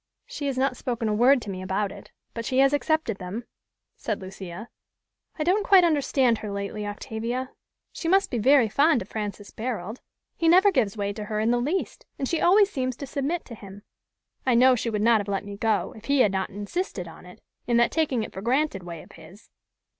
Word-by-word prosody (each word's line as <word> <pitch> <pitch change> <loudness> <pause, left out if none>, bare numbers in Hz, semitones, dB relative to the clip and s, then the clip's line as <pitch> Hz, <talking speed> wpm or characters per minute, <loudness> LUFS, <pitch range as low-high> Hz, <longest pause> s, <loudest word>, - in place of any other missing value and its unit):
"She - - -5
has 270 -2 -2
not 260 0 +1
spoken 240 -2 -3
a 215 - +1
word 245 +3 +4
to - - -7
me 185 -1 -6
about 190 +2 -1
it, - - -12 0.2
but 230 - -4
she 255 +3 -2
has 275 +1 +5
accepted 290 -7 0
them," 190 +6 -5 0.5
said 215 -3 -3
Lucia. 190 +2 -8 0.7
"I 310 - -1
don't 375 +6 +2
quite 390 -3 +6
understand 275 -7 +2
her 210 - -6
lately, 200 +1 -4
Octavia. 230 +5 -4 0.4
She 330 - -5
must 385 +3 +3
be 240 - -1
very 260 +1 +5
fond 280 - +3
of 190 - -20
Francis 205 -1 -5
Barold. 220 -2 -5 0.4
He 335 - 0
never 375 +4 +6
gives 225 - 0
way 200 0 -2
to 210 0 -6
her 215 0 -3
in 220 +2 +2
the 240 0 +1
least, 320 +9 -3
and 270 - -2
she 330 - -1
always 400 +3 +5
seems 255 - -2
to 280 - -7
submit 285 +5 -3
to 240 - -10
him. 200 -2 -11 0.6
I 255 -2 +2
know 255 +2 +6
she 235 -1 -1
would 210 -2 -1
not 230 -1 +5
have 205 - -8
let 200 0 -2
me 205 0 -7
go, 215 0 0
if 220 0 -13
he 280 +1 +3
had 210 - +4
not 190 0 -2
insisted 205 - -4
on 165 +2 -13
it, 180 - -14 0.3
in 240 -1 +2
that 235 0 +3
taking 280 -8 0
it - - -8
for 190 - -6
granted 255 -2 0
way 170 -2 -8
of - - -18
his." 195 +6 -16
235 Hz, 220 wpm, -25 LUFS, 205-280 Hz, 0.7 s, quite